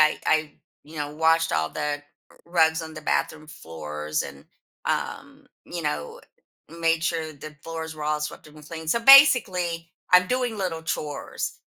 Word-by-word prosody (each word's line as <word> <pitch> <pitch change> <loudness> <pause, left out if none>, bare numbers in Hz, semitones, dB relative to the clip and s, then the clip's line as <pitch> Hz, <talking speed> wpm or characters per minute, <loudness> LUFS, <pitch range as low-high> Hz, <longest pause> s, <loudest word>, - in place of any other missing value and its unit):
I 155 0 +4
I, 155 -1 +2 0.3
you 155 +2 -13
know, 145 0 -4
washed 165 +1 +3
all 80 0 +1
the 150 -1 -3 0.4
rugs 160 -1 +2
on 160 0 -8
the 155 - -7
bathroom 155 0 -1
floors 75 - -5
and, - - -10 0.4
um, - - -3 0.2
you - - -6
know, 75 0 -3 0.6
made 165 -1 +2
sure 165 -2 -2
the 155 +1 -10
floors 160 -1 -6
were 155 -1 -6
all 150 0 0
swept 150 - -6
up 150 - -18
and 150 - -13
clean. 160 -1 -7
So 235 - +2
basically, 195 - +6 0.2
I'm 180 0 +7
doing 250 -2 -1
little 175 -4 -3
chores, 150 -2 -4
160 Hz, 165 wpm, -25 LUFS, 150-165 Hz, 0.6 s, I'm